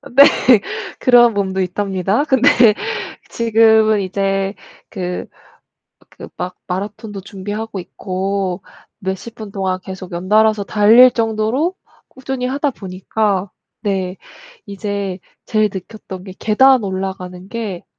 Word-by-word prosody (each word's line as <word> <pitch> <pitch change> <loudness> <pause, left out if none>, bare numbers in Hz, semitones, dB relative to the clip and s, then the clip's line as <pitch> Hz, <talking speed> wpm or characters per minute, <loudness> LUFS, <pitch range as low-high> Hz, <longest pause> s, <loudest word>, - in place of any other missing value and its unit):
그 - - -11
네. 280 - +10 0.7
그런 240 -2 +5
몸도 190 -1 -1
있답니다. 195 +5 0
근데 265 -3 +3 0.8
지금은 220 -2 +4
이제 195 +1 -1 0.4
그 180 -3 -4 0.9
그 - - -11
막 180 0 -4
마라톤도 205 +2 -5
준비하고 205 +2 -6
있고 190 +1 -3 0.4
몇십 190 +4 -5
분 215 -3 -9
동안 190 -2 -1
계속 190 -1 -8
연달아서 210 +4 +2
달릴 220 +5 +6
정도로 230 - 0 0.3
꾸준히 260 -1 -4
하다 280 +3 0
보니까 195 -1 -2 0.3
네 190 -3 -2 0.5
이제 200 -2 -4 0.3
제일 215 -1 +2
느꼈던 190 -1 -8
게 190 - -9
계단 255 +2 +4
올라가는 190 -1 -5
게 210 -6 -5
200 Hz, 235 characters per minute, -18 LUFS, 190-225 Hz, 0.9 s, 네